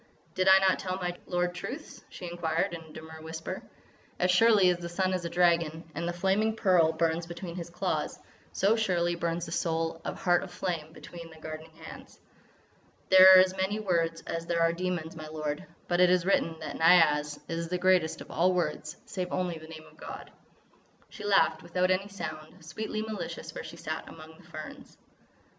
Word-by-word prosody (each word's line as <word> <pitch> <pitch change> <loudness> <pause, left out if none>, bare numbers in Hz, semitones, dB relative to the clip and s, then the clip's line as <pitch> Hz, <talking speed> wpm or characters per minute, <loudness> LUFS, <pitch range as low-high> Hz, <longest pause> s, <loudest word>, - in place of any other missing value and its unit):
"Did 185 0 0
I 190 0 +9
not 190 -1 +3
tell 185 -1 -3
my 180 -2 -3
lord 180 0 0
truths?" 265 - -7
she 180 - -9
inquired 170 -1 -1
in 170 - -6
a 160 -1 -15
demure 160 0 -10
whisper. 160 0 -6 0.6
"As 180 0 +2
surely 205 0 +5
as 175 - -2
the 170 0 -6
sun 185 +2 0
is 180 -2 -2
a - - -2
dragon, 170 -2 +2
and 170 +3 -3
the - - 0
flaming 195 +5 +1
pearl 180 -7 +4
burns 165 +1 0
between 175 0 -7
his 170 -1 -6
claws, 170 - -2 0.3
so 205 +3 +2
surely 180 -6 +1
burns 170 0 -2
the 165 - -9
soul 165 0 -1
of - - -5
Heart 175 -1 +3
of 190 - -8
Flame 165 -5 -3
between 170 0 -11
thy 160 - -14
guarding 155 0 -8
hands. 160 0 -12 0.9
There 190 0 +10
are - - +10
as 185 0 +1
many 190 +3 -1
words 165 -5 0
as 165 0 -4
there 170 -1 0
are 165 0 +3
demons, 170 -2 -3
my 155 -1 -8
lord, 155 -1 -4 0.2
but 175 0 +1
it 180 0 +6
is 180 -1 +3
written 165 -4 +1
that 155 - -6
Niaz 150 -3 +4
is 165 0 -3
the 180 - 0
greatest 180 -3 +2
of - - -10
all 180 +3 +2
words 155 -3 -2
save 180 -2 -4
only 180 -3 -2
the 160 - -12
name 160 -1 -10
of - - -19
God." - - -9 0.8
She - - -10
laughed 195 -5 +3
without 180 +2 0
any 190 +2 +1
sound, 160 -4 -8
sweetly 215 +6 -4
malicious 220 -1 -6
where - - -6
she - - -10
sat - - -5
among 160 0 -12
the - - -18
ferns. - - -10
175 Hz, 195 wpm, -29 LUFS, 160-185 Hz, 0.9 s, There